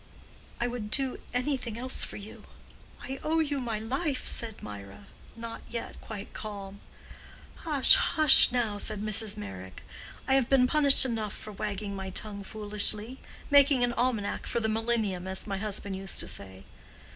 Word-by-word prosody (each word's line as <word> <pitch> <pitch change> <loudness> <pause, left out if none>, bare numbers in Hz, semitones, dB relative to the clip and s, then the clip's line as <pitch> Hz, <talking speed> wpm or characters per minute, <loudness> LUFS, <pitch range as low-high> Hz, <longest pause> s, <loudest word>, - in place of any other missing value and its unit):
"I 240 - 0
would 240 -3 -4
do 265 +3 0
anything 250 -3 -1
else 255 +2 +3
for - - -4
you. 205 +1 -11 0.6
I 270 0 -6
owe 320 +1 0
you 290 -3 0
my 235 -4 -3
life," 265 +6 -3
said 225 -2 0
Mirah, 100 -1 -10 0.3
not 230 0 -8
yet 235 0 -6
quite 210 -2 -8
calm. 200 -2 -8 0.8
"Hush, 295 -5 +4
hush, 310 -3 +7
now," 225 -4 -1
said 215 0 0
Mrs. 215 0 +1
Meyrick. 95 -2 -9 0.4
"I 265 - +2
have 265 -2 +2
been 265 -2 +5
punished 280 0 +5
enough 220 -5 -3
for 215 - -8
wagging 200 0 -5
my 190 -1 -5
tongue 200 +1 -4
foolishly—making 220 +6 0
an 240 0 +1
almanac 235 -4 -1
for - - -1
the 220 - -1
Millennium, 220 -5 -1
as 190 0 -2
my 195 -2 -4
husband 200 -1 -2
used 195 0 -3
to - - -5
say." 95 0 -3
220 Hz, 155 wpm, -28 LUFS, 200-255 Hz, 0.8 s, hush